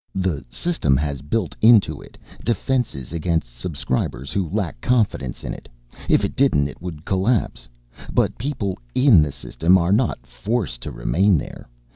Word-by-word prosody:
The 90 -7 -1
System 70 - 0
has 70 -2 -2
built 90 +7 -2
into 110 -2 +5
it - - -15 0.3
defenses 115 - -1
against 80 -7 -1
Subscribers 65 -1 -3
who 95 -5 -1
lack 85 - -3
confidence 110 - 0
in - - -4
it - - -11 0.4
if - - +4
it - - -5
didn't 125 - +3
it 75 - -11
would 85 -3 -7
collapse. 100 +4 0 0.4
But - - +1
people 110 - -3 0.2
in 125 - +6
the 75 -1 0
System 85 +6 +2
are 90 +1 +2
not 105 - 0
forced 60 - -3
to - - -6
remain 95 +1 +2
there. 70 - -7
90 Hz, 155 wpm, -22 LUFS, 70-110 Hz, 0.4 s, in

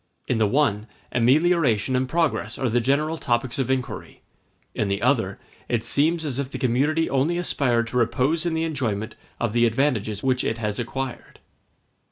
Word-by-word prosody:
In 120 - 0
the 110 - +3
one, 110 -3 +1 0.2
amelioration 130 - +2
and 130 0 0
progress 165 -1 0
are 130 - 0
the 120 +2 +1
general 150 +6 0
topics 120 +1 -1
of 130 - -1
inquiry; 130 -3 -4 0.5
in 105 - -1
the 100 0 -1
other, 115 -6 +1 0.3
it 115 -2 0
seems 160 +3 +2
as 140 -3 -3
if 140 -2 -3
the - - -6
community 145 +6 +1
only 140 +6 +1
aspired 125 -9 +1
to 125 - -2
repose 125 +7 +1
in 170 -2 -1
the 160 - 0
enjoyment 115 -9 -2 0.3
of 120 -3 -1
the 120 0 +4
advantages 110 -4 0
which 130 -1 +1
it 115 - -1
has 105 -1 -3
acquired. 130 +2 -5
130 Hz, 175 wpm, -24 LUFS, 115-145 Hz, 0.5 s, the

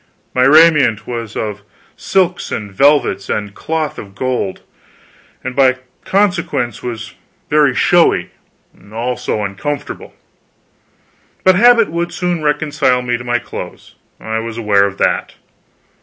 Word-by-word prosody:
My 125 0 +3
raiment 150 -7 +5
was 115 -3 -6
of 105 -2 -4 0.3
silks 185 -2 0
and 105 -2 -4
velvets 140 -3 +2
and 105 -1 -2
cloth 160 +3 -3
of 100 -2 -11
gold, 125 -5 -2 0.8
and 130 - -5
by 130 -2 +4 0.3
consequence 175 -11 0
was 115 -2 -6 0.4
very 145 -4 +3
showy, 175 -1 +3 0.6
also 120 -1 -2
uncomfortable. 100 +9 -5 1.3
But 185 - +6
habit 230 0 +5
would 170 +1 -2
soon 175 -1 -2
reconcile 150 -4 +1
me 120 -1 -1
to 120 - -6
my 120 0 0
clothes; 120 - -9 0.3
I 110 0 -3
was 115 0 -6
aware 105 -3 +3
of 100 0 -8
that. - - 0
125 Hz, 125 wpm, -16 LUFS, 110-160 Hz, 1.3 s, But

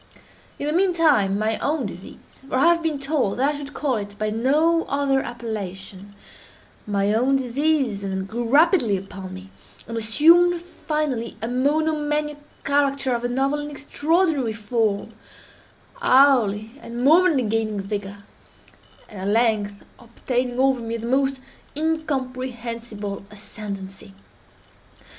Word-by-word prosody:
In - - -4
the 300 - 0
mean 365 +2 +3
time 270 - +3
my 215 +1 0
own 295 -3 -1
disease—for 200 +8 -9
I 265 - +4
have 335 - -3
been 320 -3 -1
told 275 -7 -1
that 275 +4 +2
I - - -5
should 285 0 -8
call 270 -5 0
it 205 0 -6
by 215 0 -1
no 305 +9 +2
other 275 -1 +1
appellation—my 200 -2 -6
own 255 +5 +2
disease, 265 -3 0
then, 190 -1 -3
grew 230 +3 -4
rapidly 285 - +4
upon 190 0 -8
me, 190 +1 -11 0.4
and 230 - -6
assumed 335 +11 +4
finally 300 -8 -3
a 225 - -3
monomaniac 295 +3 0 0.2
character 280 -2 +1
of 240 0 -2
a 245 - 0
novel 270 +4 0
and 295 0 -5
extraordinary 290 -2 0
form—hourly 225 - 0
and 235 +1 -5
momently 315 -1 +5
gaining 215 -1 -1
vigor—and 200 0 -10
at 190 - -3
length 210 -2 +1 0.2
obtaining 245 +1 -3
over 265 -2 +3
me 230 0 -3
the 230 - -7
most 270 +2 +1 0.4
incomprehensible 255 -9 -3
ascendancy. 200 -1 -8
245 Hz, 125 wpm, -23 LUFS, 210-290 Hz, 0.4 s, momently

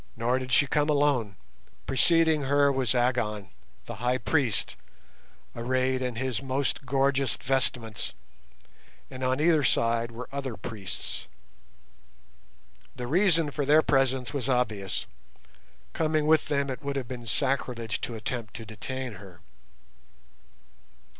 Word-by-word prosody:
Nor 120 +3 +1
did 130 0 -6
she 130 - +5
come 145 +2 +1
alone. 140 -8 +2 0.5
Preceding 160 +4 +4
her 140 +1 +4
was 130 -2 +1
Agon, 115 -6 0 0.3
the - - -7
High 125 +2 +1
Priest, 125 -4 0 0.8
arrayed 130 +2 0
in 125 -2 -2
his 125 -2 -2
most 135 +1 -2
gorgeous 135 -1 +2
vestments, 125 - 0 1.0
and 130 0 -7
on 130 +1 +1
either 155 -1 +3
side 115 -2 +2
were 120 +2 -8
other 135 -5 -4
priests. 100 -2 -6 1.7
The 125 - -5
reason 165 +1 +3
for 145 - -2
their 150 +3 +5
presence 135 -3 +1
was 135 -2 -2
obvious—coming 100 - -3
with 155 0 +3
them 140 -1 0
it 130 - -6
would 140 -1 -3
have 135 -3 -3
been 120 -2 -7
sacrilege 120 -3 -1
to 120 - -4
attempt 110 0 -4
to 115 - -6
detain 125 +3 -5
her. 95 -4 -14
130 Hz, 125 wpm, -27 LUFS, 115-140 Hz, 1.7 s, she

